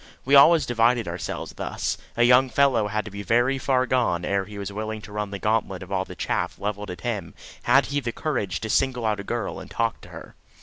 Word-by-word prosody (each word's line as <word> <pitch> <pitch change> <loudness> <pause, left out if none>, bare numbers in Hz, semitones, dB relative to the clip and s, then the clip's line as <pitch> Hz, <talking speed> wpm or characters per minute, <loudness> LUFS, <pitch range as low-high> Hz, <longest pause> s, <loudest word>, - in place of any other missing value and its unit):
We 135 - 0
always 150 +1 +7
divided 120 -2 +2
ourselves 85 0 -5
thus. - - -3 0.2
A 120 - +4
young 125 +2 +5
fellow 130 -6 +3
had 105 0 -2
to 105 - -8
be 100 +1 -6
very 120 +5 +2
far 130 -1 +1
gone 115 -10 +1
ere 100 -1 0
he 105 +1 -10
was 100 0 -5
willing 110 +1 -4
to 105 - -11
run 105 0 -3
the 100 - -5
gauntlet 105 -3 -1
of 90 - -13
all 95 -1 0
the - - -10
chaff - - -2
levelled 105 0 -4
at 90 - -7
him 105 -8 -4 0.3
had 135 +3 +4
he 145 0 -1
the 120 -4 -3
courage 115 -10 -2
to 110 - -4
single 125 -3 +1
out 105 -2 0
a - - -5
girl 115 0 -3
and - - -10
talk 115 -1 -1
to - - -14
her. - - -11
110 Hz, 235 wpm, -24 LUFS, 100-125 Hz, 0.3 s, always